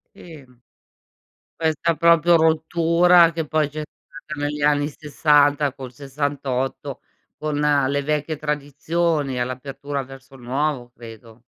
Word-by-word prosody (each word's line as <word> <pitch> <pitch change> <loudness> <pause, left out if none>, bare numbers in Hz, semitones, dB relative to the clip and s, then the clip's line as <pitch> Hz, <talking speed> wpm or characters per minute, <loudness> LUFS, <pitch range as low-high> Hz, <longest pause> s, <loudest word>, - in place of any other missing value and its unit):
Sì, 155 -6 -13 1.1
questa 160 0 0
proprio 170 0 +5
rottura 165 +2 +4
che 165 -2 -3
poi 155 -1 0
c'è 155 +1 -5
stata 155 -1 -11
negli 150 0 -3
anni 145 0 +2
60 145 -1 +2
col 130 -2 -9
68 135 -2 -3 0.4
con 155 -1 -3
le 145 -1 +1
vecchie 150 +1 -2
tradizioni 150 -1 -1
all'apertura 135 +3 -4
verso 135 0 -14
il 130 - -14
nuovo, 130 0 -2
credo. 115 0 -13
145 Hz, 115 wpm, -22 LUFS, 135-155 Hz, 1.1 s, proprio